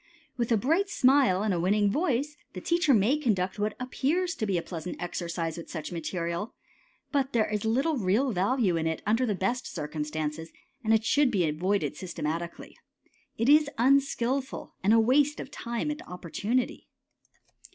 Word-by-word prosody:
With 235 -1 -2
a 225 - +5
bright 325 - +1
smile 255 -8 +4
and 210 -3 +1
a 175 - 0
winning 200 +3 +2
voice, 290 - 0 0.2
the - - -5
teacher 340 -3 +2
may 240 +5 +3
conduct 200 -8 0
what 210 0 -1
appears 305 +8 0
to 215 - -3
be 190 -3 +1
a 170 - -2
pleasant 175 0 -6
exercise 170 -2 -3
with 170 - -8
such 160 -1 -5
material, 170 +3 -3 0.6
but 275 -2 0
there 225 -2 +3
is 210 0 -2
little 270 +8 +1
real 225 +6 +1
value 200 0 +1
in 160 0 0
it 160 -1 -3
under 230 +5 +2
the 210 - 0
best 215 +7 -1
circumstances 155 0 -4 0.3
and 220 - +1
it 220 0 +3
should 290 +1 +4
be 190 -8 +1
avoided 185 +7 0
systematically. 170 -1 -5 0.6
It 230 - 0
is 300 0 +6
unskilful, 265 +1 +1
and 200 - +4
a 225 - +6
waste 280 +6 +3
of - - -7
time 235 +2 -3
and 300 - -6
opportunity. 200 +8 -2
215 Hz, 170 wpm, -28 LUFS, 180-265 Hz, 0.6 s, is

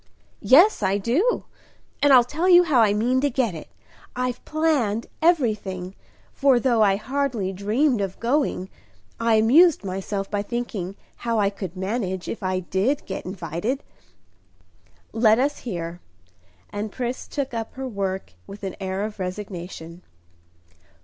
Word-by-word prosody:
"Yes, 340 - +6
I 195 0 +2
do, 265 - +1 0.6
and 290 - +5
I'll 255 -2 +8
tell 315 +9 -1
you 355 0 +8
how 290 -8 +3
I 215 -2 +4
mean 240 +5 +1
to 285 - +2
get 240 -6 0
it. 160 - -8 0.5
I've 250 0 -2
planned 280 -9 0 0.2
everything; 215 - +1 0.4
for, 275 -3 +4
though 240 -2 +2
I 200 -2 +5
hardly 240 -4 -2
dreamed 220 +6 +1
of 195 -1 -4
going, 235 -7 0 0.5
I 230 -1 +3
amused 270 - +5
myself 195 +1 -3
by 205 0 -2
thinking 205 -4 -4 0.2
how 230 -1 -1
I 200 -2 +2
could 190 -3 -7
manage 190 -2 -3
if 230 - -5
I 185 -1 -1
did 195 +10 -1
get 190 - -6
invited." 185 - -3 1.3
"Let 220 -1 +4
us 285 +3 0
hear." 175 -6 -5 0.7
And 205 +1 -4
Pris 250 +2 -4
took 275 -3 -4
up 225 -1 -5
her 265 0 -4
work 195 - -4
with 200 +1 -11
an 190 - -4
air 190 +1 -3
of 210 -1 -5
resignation. 180 -3 -6
220 Hz, 145 wpm, -24 LUFS, 190-260 Hz, 1.3 s, I'll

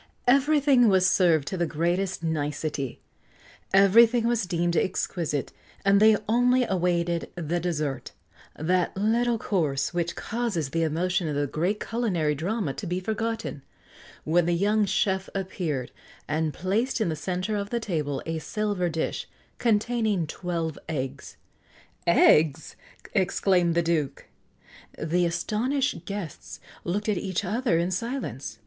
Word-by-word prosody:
Everything 275 -2 +4
was 185 -1 +4
served 170 -6 +3
to 190 - -3
the 170 -1 0
greatest 175 +4 -1
nicety, 150 -3 -2 0.7
everything 225 +5 +6
was 235 -5 0
deemed 175 0 0
exquisite, 170 -5 -1 0.3
and 200 0 +5
they 215 0 +6
only 245 +3 +3
awaited 175 -4 0
the 175 0 -2
dessert 150 -7 -3 0.5
that 180 +3 0
little 230 +3 +2
course 155 -10 -1
which 170 -1 -1
causes 225 - -2
the 165 +2 0
emotion 170 +2 0
of 150 - -2
the 145 0 +1
great 175 +9 -1
culinary 185 -11 0
drama 175 +1 -2
to 190 - -6
be 180 +2 -1
forgotten 220 -5 -3 0.6
when 170 +2 +2
the 175 - +2
young 205 +4 +2
chef 190 0 0
appeared, 170 -9 -3 0.4
and 155 +1 0
placed 215 - -1
in 215 -6 +1
the 160 - -1
centre 185 +6 -2
of 200 0 -3
the 235 - -1
table 150 - -2
a 165 0 -2
silver 205 -1 -1
dish, 160 0 -3 0.3
containing 220 -4 +1
twelve 165 -1 -4
eggs. 135 -4 -5 0.7
"Eggs!" 155 0 +4 0.4
exclaimed 180 -2 +2
the 170 - +3
Duke. 160 -4 -1 0.7
The 175 +3 +1
astonished 235 +11 -1
guests 200 -7 -6 0.2
looked 205 +5 -2
at 210 -3 +1
each 190 0 -2
other 220 -1 +1
in 170 +2 0
silence. 210 - -4
180 Hz, 135 wpm, -26 LUFS, 160-215 Hz, 0.7 s, everything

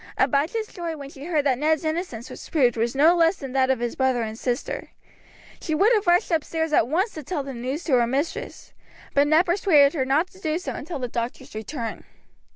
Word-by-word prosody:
Abijah's 315 +11 +1
joy 340 -6 -6
when 280 -1 -9
she 275 0 -10
heard 310 -4 0
that 260 -3 +2
Ned's 315 +1 +1
innocence 315 -8 -3
was - - -10
proved 260 -7 +3
was 235 +2 -1
no 315 +5 +5
less 330 +1 +4
than 270 -6 -8
that 260 0 +2
of 265 - +3
his 240 0 -3
brother 260 -3 +1
and 220 0 -5
sister. 245 +3 -3 0.7
She 315 - -1
would 410 +9 +4
have 420 -4 +1
rushed 350 +3 +3
upstairs 320 0 -1
at 235 - +4
once 370 - 0
to 310 - -6
tell 295 0 -3
the 270 0 -6
news 260 +7 -4
to 300 - -1
her 240 -2 +4
mistress, 280 +6 -4 0.4
but 285 +1 +4
Ned 315 +4 +4
persuaded 340 -6 +4
her 285 -6 0
not 290 +7 +1
to 375 - -17
do 315 -3 -1
so 365 - -5
until 330 +2 -6
the 255 -2 -3
doctor's 235 0 -5
return. 225 +1 -5
290 Hz, 220 wpm, -24 LUFS, 260-335 Hz, 0.7 s, no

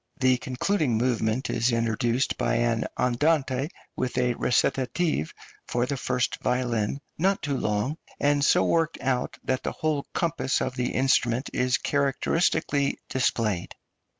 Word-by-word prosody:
The 130 -1 +4
concluding 130 - 0
movement 115 0 0
is 120 +1 +1
introduced 115 +2 0
by 120 - 0
an 115 -1 +1
andante 135 +1 +1 0.3
with 130 -1 -2
a 125 -1 +2
recitative 130 - 0 0.4
for 120 0 0
the 140 - -2
first 125 -2 -1
violin, 125 0 0 0.2
not 195 +3 +1
too 145 -2 -1
long, 110 +6 -1 0.2
and 145 0 +2
so - - +4
worked 165 -1 +1
out 130 -2 -1
that 130 0 -1
the - - -3
whole 155 -3 -1
compass 165 -5 0
of - - -2
the 125 -1 -1
instrument 130 -1 +1
is 125 -1 +2
characteristically 140 0 +1
displayed. 110 -7 0
130 Hz, 135 wpm, -26 LUFS, 120-140 Hz, 0.4 s, The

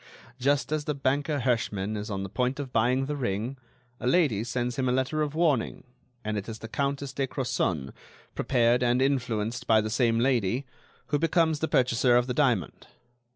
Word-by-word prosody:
Just 140 +3 +1
as 155 -1 -1
the 150 - -1
banker 140 +1 0
Herschmann 110 -4 -1
is 105 +1 -5
on 95 -2 -3
the - - -4
point 125 +6 -1
of 135 -3 -5
buying 125 +4 +2
the 150 +2 -3
ring, 120 0 -2 0.4
a 125 - -3
lady 130 - +3
sends 120 0 -2
him 130 0 0
a - - +2
letter 130 +4 0
of 150 0 -2
warning, 155 -8 +1 0.4
and 105 -1 -2
it 100 - -8
is 110 - -6
the 115 - -8
Countess 140 +2 -2
de 135 -1 -1
Crozon, 120 - -2 0.4
prepared 120 -1 +2
and 125 0 +2
influenced 125 -4 -1
by 110 -1 +5
the 110 0 -2
same 115 -1 +2
lady, 125 0 +1 0.4
who 145 - +1
becomes 165 -1 +2
the 160 - 0
purchaser 125 -2 +3
of 120 - +2
the 125 - -2
diamond. 125 - 0
125 Hz, 190 wpm, -27 LUFS, 115-140 Hz, 0.4 s, by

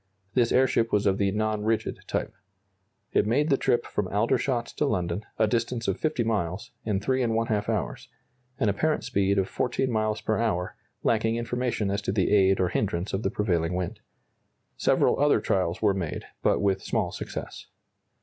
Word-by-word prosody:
This 120 -1 +2
airship 125 -3 +3
was 105 0 +2
of 100 -1 +2
the 100 -1 +2
non 110 +1 -1
rigid 110 +1 -1
type. - - -2 0.8
It 105 - +2
made 145 +7 +2
the - - +6
trip 125 -3 +1
from 105 - -2
Aldershot 115 +4 +1
to 150 - +2
London, 90 -3 -1
a 110 - +4
distance 115 +1 -1
of 95 - 0
50 155 -6 0
miles, 100 -4 -2
in 105 -3 0
3½ 115 -3 0
hours 110 -4 -2 0.5
an 110 - +2
apparent 150 +10 +1
speed 100 0 +1
of 95 -1 +2
14 125 +1 -1
miles 110 -1 0
per 110 - -1
hour, 95 -6 -1 0.3
lacking 110 0 +2
information 120 -3 -1
as 100 +1 -1
to 100 - -2
the 95 -2 +1
aid 95 -1 +4
or 90 -2 +2
hindrance 95 -1 -1
of 95 - 0
the 95 - 0
prevailing 90 -5 0
wind. 90 +4 -3 0.8
Several - - +2
other 145 -4 +4
trials 90 -2 -1
were 105 -2 +4
made, 90 -5 -4 0.2
but - - +2
with 95 -1 +1
small 100 -6 -1
success. - - -7
105 Hz, 175 wpm, -27 LUFS, 95-115 Hz, 0.8 s, the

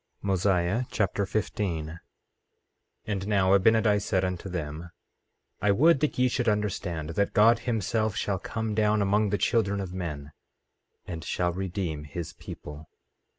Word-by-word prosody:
Mosiah 95 +3 +1
Chapter 100 -1 0
15 95 -7 -2
15:1 80 +2 -9 1.1
And 100 -2 -3
now 100 -2 +4
Abinadi 105 +1 +4
said 95 -2 0
unto 90 +1 -4
them: 80 -1 -5 0.7
I 105 - +2
would 145 +10 +5
that 150 +1 0
ye 125 0 +4
should 125 -1 0
understand 90 -6 -2
that 100 +4 0
God 115 +2 +6
himself 110 -2 -1
shall 100 -3 -1
come 110 +2 -3
down 105 -1 +2
among 105 +1 +2
the 105 - +1
children 100 -4 +1
of 95 -2 -5
men, 75 -6 -5 0.7
and 85 -3 -6
shall 90 +2 0
redeem 90 -5 -3
his 80 +3 -6
people. 75 +1 -10
100 Hz, 145 wpm, -27 LUFS, 85-105 Hz, 1.1 s, God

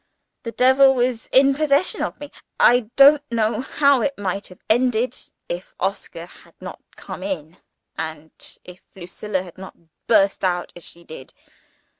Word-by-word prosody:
The 230 - -6
devil 265 +2 +4
was 245 -2 -1
in 275 +1 +4
possession 295 +3 +1
of - - -4
me. 290 -1 -9 0.3
I 240 -2 +4
don't 285 +2 +7
know 225 -1 0
how 280 -1 +2
it 280 +1 -2
might 200 0 -4
have 180 - -17
ended, 245 +1 +1 0.3
if - - -7
Oscar - - -4
had - - -20
not - - -9
come - - -9
in, 180 -3 -6 0.4
and 160 -1 -6 0.3
if 180 0 -14
Lucilla 185 +1 -5
had 180 -1 -14
not 190 - -11 0.3
burst 200 -3 +2
out 175 -1 -1
as 175 - -13
she 170 - -12
did. 155 -5 -12
225 Hz, 155 wpm, -21 LUFS, 185-270 Hz, 0.4 s, don't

